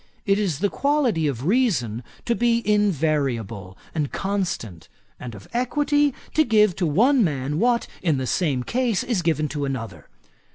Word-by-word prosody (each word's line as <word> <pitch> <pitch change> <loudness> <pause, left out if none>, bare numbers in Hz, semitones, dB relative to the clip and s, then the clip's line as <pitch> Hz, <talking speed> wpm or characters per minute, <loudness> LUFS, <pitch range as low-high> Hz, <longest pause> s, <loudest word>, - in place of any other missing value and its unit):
It 200 0 +2
is 185 -7 -1
the 205 - +2
quality 260 - +1
of 135 -2 -3
reason 165 - +1 0.2
to 235 - +2
be 235 -1 +1
invariable 140 - 0 0.2
and 150 -4 -2
constant; 180 - -3 0.3
and 120 -3 -7
of 100 - -12
equity, 290 +3 +1 0.2
to 310 - +4
give 215 - +3
to 180 - +1
one 235 - +4
man 145 -2 -1
what, 240 +1 +2 0.2
in 160 -6 +1
the 130 - -2
same 135 -3 0
case, 235 - 0
is 230 -7 -1
given 160 -2 0
to 145 -1 -3
another. 130 -5 -5
175 Hz, 160 wpm, -23 LUFS, -, 0.3 s, to